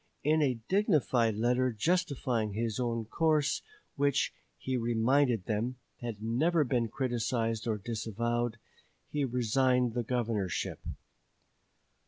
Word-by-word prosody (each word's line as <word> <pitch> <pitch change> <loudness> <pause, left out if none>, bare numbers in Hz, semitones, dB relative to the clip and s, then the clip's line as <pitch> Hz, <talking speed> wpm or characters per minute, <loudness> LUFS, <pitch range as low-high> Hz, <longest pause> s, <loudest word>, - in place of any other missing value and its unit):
In 155 +2 +3
a 130 -5 +2
dignified 150 - +2
letter 125 +3 +2
justifying 130 - 0
his 110 +1 -2
own 115 -2 -1
course, 155 +3 +1 0.3
which, 140 -1 +1 0.2
he 130 - -3
reminded 120 -1 +2
them, 115 +4 -1 0.2
had 115 -3 -5
never 155 +9 +2
been 120 -3 0
criticized 115 -2 -1
or 110 -2 +1
disavowed, 115 +2 -2 0.5
he 145 -1 0
resigned 125 0 +2
the 120 - 0
governorship. 110 -7 -1
120 Hz, 110 wpm, -31 LUFS, 115-135 Hz, 0.5 s, In